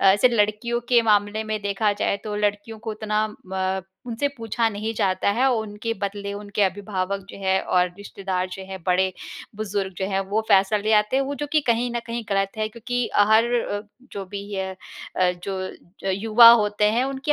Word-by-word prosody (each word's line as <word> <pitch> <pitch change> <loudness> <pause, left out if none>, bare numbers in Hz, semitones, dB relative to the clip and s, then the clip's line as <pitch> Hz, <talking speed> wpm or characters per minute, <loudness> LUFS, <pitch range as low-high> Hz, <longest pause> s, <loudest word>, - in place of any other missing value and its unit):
ऐसे 200 +5 +5
लड़कियों 235 +1 +1
के 245 -1 +6
मामले 210 -1 +2
में 215 -1 -3
देखा 205 +1 +1
जाए 205 0 0
तो 210 -1 -4
लड़कियों 210 +1 -2
को - - -1
उतना 215 0 -1 0.2
म 190 0 -2 0.2
उनसे 245 +5 -1
पूछा 230 0 0
नहीं 215 +1 -3
जाता 190 -1 +1
है 260 +3 +3
और 245 - +2
उनके 210 +2 -4
बदले 200 0 -3
उनके 205 0 -2
अभिभावक 195 0 -1
जो - - -10
हैं 190 -1 +1
और 180 0 +2
रिश्तेदार 190 -2 -3
जो 190 - -6
हैं 190 0 -7
बड़े-बुजुर्ग 190 +2 -2
जो 190 - -1
हैं 195 -1 0
वो 210 +2 +1
फैसला 200 +1 +4
ले 215 +2 0
आते 210 +4 +3
हैं, 275 - +3
वो 280 +1 -3
जो 295 - -4
कि 310 - +4
कहीं 240 +1 +2
न 235 - 0
कहीं 235 0 -3
गलत 195 -1 0
है 215 0 0
क्योंकि 240 +2 -2
अ, 205 - +4
हर 220 +1 +6
अ, 205 -4 -1 0.3
जो 200 - -5
भी 200 +1 -6
ये 190 -1 -1 0.5
अ, 180 -1 +3
जो 190 0 -5
युवा 220 +4 +7
होते 210 -2 +3
हैं 235 +3 +2
उनकी 270 +2 -1
210 Hz, 195 wpm, -23 LUFS, 195-225 Hz, 0.5 s, युवा